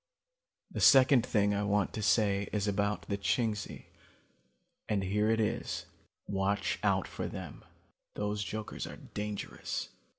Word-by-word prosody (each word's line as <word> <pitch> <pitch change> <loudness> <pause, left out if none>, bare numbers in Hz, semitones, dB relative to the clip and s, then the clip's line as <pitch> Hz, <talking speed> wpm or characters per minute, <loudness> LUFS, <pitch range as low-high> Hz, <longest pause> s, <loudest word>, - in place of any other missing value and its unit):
"The - - -4
second 130 -2 +7
thing 105 -4 +2
I 100 - 0
want 100 -1 +1
to 110 - -3
say 100 +1 +2
is 105 -1 0
about 100 +1 0
the 100 -1 -3
Chingsi, 105 0 -1 1.0
and 100 -2 +1
here 105 +3 +1
it 115 0 +2
is: 110 - -1 0.4
watch 100 +1 0
out - - +2
for - - -4
them. - - -8 0.5
Those 105 0 -1
jokers 110 +1 -5
are - - -8
dangerous. 105 0 -5
105 Hz, 135 wpm, -32 LUFS, 100-110 Hz, 1.0 s, second